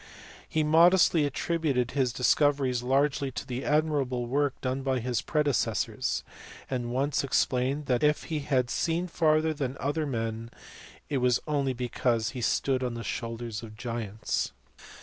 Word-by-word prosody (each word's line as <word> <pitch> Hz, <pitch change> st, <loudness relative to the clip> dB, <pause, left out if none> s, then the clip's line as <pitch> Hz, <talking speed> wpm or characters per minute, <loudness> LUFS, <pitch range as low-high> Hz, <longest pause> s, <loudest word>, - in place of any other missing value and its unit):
He 155 Hz, -, +1 dB
modestly 165 Hz, 0 st, +5 dB
attributed 140 Hz, -3 st, -1 dB
his 130 Hz, -3 st, +1 dB
discoveries 130 Hz, 0 st, +2 dB
largely 135 Hz, +2 st, +1 dB
to 125 Hz, -, -5 dB
the 125 Hz, +1 st, -4 dB
admirable 145 Hz, -5 st, +1 dB
work 140 Hz, +2 st, 0 dB
done 130 Hz, +1 st, -2 dB
by 135 Hz, -1 st, 0 dB
his 120 Hz, -2 st, -1 dB
predecessors; 150 Hz, -4 st, 0 dB, 0.5 s
and 125 Hz, -2 st, -2 dB
once 135 Hz, +4 st, 0 dB
explained 135 Hz, +2 st, +1 dB
that, 125 Hz, -2 st, +1 dB
if 150 Hz, 0 st, +2 dB
he 155 Hz, -2 st, -3 dB
had 130 Hz, -4 st, 0 dB
seen 170 Hz, +1 st, 0 dB
farther 160 Hz, -2 st, +2 dB
than 140 Hz, -3 st, -3 dB
other 145 Hz, +3 st, -1 dB
men, 115 Hz, -2 st, -3 dB, 0.6 s
it 140 Hz, -3 st, -1 dB
was 125 Hz, -1 st, +3 dB
only 140 Hz, -3 st, 0 dB
because 120 Hz, -2 st, 0 dB
he 130 Hz, -, -6 dB
had 120 Hz, -, 0 dB
stood 130 Hz, -2 st, +1 dB
on 125 Hz, -2 st, -2 dB
the 115 Hz, -, -5 dB
shoulders 115 Hz, -1 st, -4 dB
of 110 Hz, -2 st, -11 dB
giants. 115 Hz, -3 st, -3 dB
130 Hz, 150 wpm, -28 LUFS, 120-150 Hz, 0.6 s, modestly